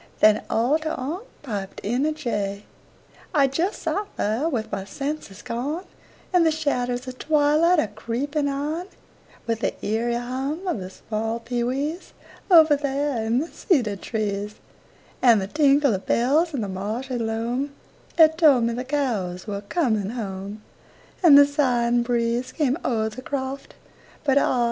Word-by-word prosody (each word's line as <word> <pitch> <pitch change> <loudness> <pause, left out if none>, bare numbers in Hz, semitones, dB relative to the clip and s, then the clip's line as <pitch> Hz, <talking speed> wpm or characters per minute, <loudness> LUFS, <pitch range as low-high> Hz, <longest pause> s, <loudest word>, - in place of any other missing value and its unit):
Then 215 0 +5
all 250 +8 +2
ter 315 0 -3
onct 320 - -5 0.2
piped 200 -7 -5
in 245 +8 0
a - - +1
jay. 205 -9 -3 0.7
I 280 -2 +5
just 325 +9 -1
sot 410 0 -1
there 230 +10 0
with 225 -7 -3
my 195 - -3
senses 275 -2 -5
gone, 290 +10 -3 0.5
And 360 -2 +5
the 325 - +4
shadders 255 -5 -1
of 255 0 -7
twilight 310 +3 +3
a 270 - +2
creepin' 270 +8 -2
on, 300 +6 -2 0.6
With 230 -1 -1
the - - -1
eerie 230 +3 0
hum 265 +8 -3
of 340 - -1
the 185 0 -6
small 225 +3 -3
pee 240 +1 -2
wees, 285 +8 -3 0.4
Over 320 -4 +7
there 280 -3 -1
in 225 +2 +1
the 320 - -3
cedar 245 - +1
trees, 210 0 -3 0.7
And 235 -4 +6
the 190 - -2
tinkle 280 +2 +3
of 190 - -4
bells 295 +8 +2
in 255 - -1
the 205 - -2
marshy 220 +7 -3
loam 230 +5 -2 0.5
'At 320 0 +6
told 285 -8 +6
me 230 0 +1
the 245 +2 -3
cows 230 -11 -2
were 200 -2 -4
coming 220 - 0
home, 200 -1 -6 0.6
And 320 -6 +8
the 285 - +9
sighing 245 -5 +2
breeze 235 +1 0
came 280 -5 +1
o'er 220 -3 0
the 240 +4 -9
croft, 270 0 -5 0.5
But 280 -2 +4
ah! 255 - +1
250 Hz, 160 wpm, -24 LUFS, 220-295 Hz, 0.7 s, the